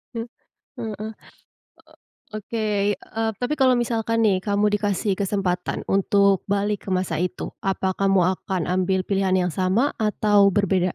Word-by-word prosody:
E - - -2
heeh. 225 - -4 0.5
Eee, 220 -1 -5 1.2
Oke, 215 +1 -4 0.3
eee, 225 +4 -4
tapi 250 +4 0
kalau 260 -2 +5
misalkan 230 -1 0
nih, 200 -4 +3
kamu 205 +2 +1
dikasih 205 -1 -1
kesempatan 190 -3 -1
untuk 195 0 +3
balik 205 +1 -1
ke - - -4
masa 185 0 -1
itu, 180 +1 -3
apa 190 -1 -1
kamu 195 0 +2 0.2
akan 185 -3 -3
ambil 185 +1 +1
pilihan 195 0 0
yang 180 -1 +1
sama 190 - +1
atau 210 -1 +3
berbeda? 185 -3 +1
200 Hz, 145 wpm, -23 LUFS, 185-215 Hz, 1.2 s, kalau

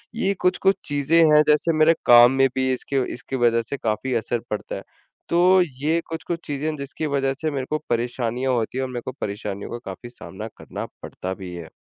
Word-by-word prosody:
ये 200 -4 +1
कुछ-कुछ 190 +2 +3
चीज़ें 145 +2 +1 0.2
हैं 150 - +8
जैसे 150 +2 +3
मेरे 155 +2 +6
काम 120 +1 +8
में 135 0 +4
भी 130 0 +1
इसके 135 +2 -1
व - - +1
इसके 130 +2 -6
वजह 120 -2 +3
से 140 - -3
काफ़ी 110 +3 -2
असर 115 +1 -1
पड़ता 105 - -4
है। - - -7 0.5
तो 180 +2 +5 0.2
ये 160 +3 +2
कुछ-कुछ 165 +1 -4
चीज़ें 145 +1 -2
हैं 155 - -3
जिसकी 140 +2 -5
वजह 135 -2 0
से 155 -1 0
मेरे 135 -2 -3
को 155 - +1
परेशानियाँ 120 +2 -1
होती 120 +1 -1
है 130 - 0
और 130 - -3
मेरे 125 -1 -4
को - - -3
परेशानियों 100 -1 -4
का 120 - -3
काफ़ी 95 +5 -7
सामना 110 -3 -8
करना - - -6 0.2
पड़ता 95 +1 -5
भी 95 -2 -8
है। 85 -2 -8
130 Hz, 215 wpm, -23 LUFS, 115-150 Hz, 0.5 s, हैं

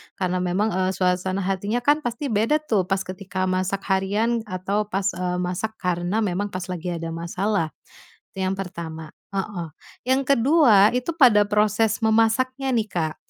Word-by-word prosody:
karena 185 -1 -1
memang, 185 +4 0
eee, 185 +1 0
suasana 185 +1 0
hatinya 200 +5 -1
kan 290 +3 +4
pasti 245 +1 -3
beda 225 +8 +2
tuh 200 -10 0
pas 195 0 0
ketika 185 0 -5
masak 185 +1 -1
harian 205 +5 +1
atau 195 +3 -2
pas, 195 -1 -2
eee, 180 0 -2
masak 180 +5 -2
karena 180 +2 -1
memang 200 +1 -1
pas 185 -2 -5
lagi 180 -1 -5
ada 165 -1 -4
masalah, 170 +1 -1 0.6
itu - - -10
yang 185 - 0
pertama, 165 -4 -6 0.2
heeh. 195 -3 -3 0.4
Yang 260 +1 +3
ke-2 235 -6 +5
itu 250 +5 -2
pada 240 -9 +6
proses 210 +1 +2
memasaknya 225 +5 +2
nih 225 -3 +1
Kak, 160 -4 -2
195 Hz, 160 wpm, -23 LUFS, 180-220 Hz, 0.6 s, pada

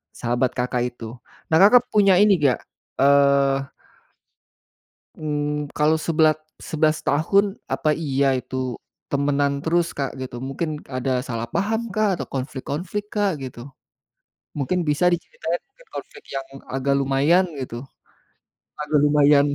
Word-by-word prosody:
sahabat 120 +1 0
Kakak 125 0 0
itu. 115 +1 -8 0.3
Nah 160 - +4
Kakak 240 +5 +7
punya 200 -3 +5
ini 205 -1 +6
nggak, 135 -4 +3 0.4
eee 140 -1 +4 1.5
mmm, 150 -1 -3
kalau 150 +1 +2
sebela 155 -1 +2 0.2
11 155 0 0
tahun 195 +7 +2 0.2
apa 155 -1 +1
iya 140 -4 +1
itu, 130 0 -4 0.4
temenan 140 0 0
terus, 170 +1 +2
Kak 140 -1 -1
gitu, 130 -2 -6
mungkin 150 +3 -4
ada 130 0 -1
salah 115 -1 -3
paham 220 - -1
kah 215 0 +2
atau - - -4
konflik-konflik, 145 +9 -4
Kak 205 -2 +2
gitu? 125 -2 -8 1.0
Mungkin 150 +6 0
bisa 150 +5 +2
diceritain 170 0 -3
mungkin - - -23
konflik 435 - -8
yang 135 0 -3 0.3
agak 135 +1 +1
lumayan 140 +7 +3 0.2
gitu, 120 -2 -5 1.0
agak 150 0 +1
lumayan 145 -1 +5
145 Hz, 125 wpm, -23 LUFS, 135-170 Hz, 1.5 s, Kakak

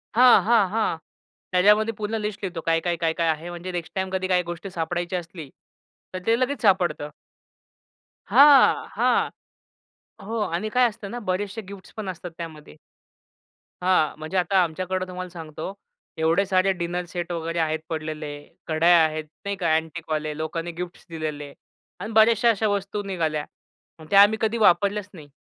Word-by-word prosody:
हां, 250 0 +7
हां, 225 -4 +4
हां. 215 -5 0 0.5
त्याच्यामध्ये 210 +5 +4
पूर्ण 215 +1 -3
लिस्ट 210 -1 -4
लिहतो. 175 -3 -4
काय, 165 0 +3
काय, 175 0 -1
काय, 165 -1 0
काय 165 0 0
आहे? 160 +2 -2
म्हणजे 175 +1 -6
नेक्स्ट 170 -2 -5
टाईम 190 0 -1
कधी 185 0 -1
काही 180 -1 +2
गोष्टी 175 +2 -6
सापडायची 175 +1 -3
असली, 165 -4 -6 0.6
तर 185 - -3
ते 230 +1 +3
लगेच 260 +2 -1
सापडतं. 175 -8 +2 1.2
हां, 285 -1 +6
हां. - - +2 1.0
हो. 225 +1 -3
आणि 190 +2 -2
काय 250 +3 +4
असतं 210 -2 -9
ना? 240 - -4
बरेचसे 200 +4 -2
गिफ्ट्स 195 -1 -12
पण 210 -3 -5
असतात 175 0 -7
त्यामध्ये. 155 - -9 1.1
हां. 180 -4 +2
म्हणजे 155 +4 -4
आता 190 +2 +2
आमच्याकडे 185 +3 -2
तुम्हाला 185 0 -6
सांगतो 165 +1 -7 0.4
एवढे 165 +5 +2
सारे 190 +1 +2
डिनर 175 -1 -3
सेट 175 -1 -4
वगैरे 165 0 -3
आहेत 160 0 0
पडलेले, 155 -2 -5 0.2
कडया 165 +2 +5
आहेत 155 0 -1 0.2
नाही 200 - -2
का? 165 -4 +1
अँटिकवाले 155 -2 -3
लोकांनी 165 +2 -4
गिफ्ट्स 175 +1 -8
दिलेले 155 -3 -5 0.5
आणि 205 +5 -5
बऱ्याचश्या 225 +1 +5
अश्या 220 0 0
वस्तू 200 0 -2
निघाल्या. 160 -6 -2 0.5
मग 155 - -12
त्या 200 0 +8
आम्ही 210 +2 +5
कधी 220 +1 +1
वापरल्याच 205 0 +3
नाही. 155 -5 -12
180 Hz, 160 wpm, -24 LUFS, 160-200 Hz, 1.2 s, त्या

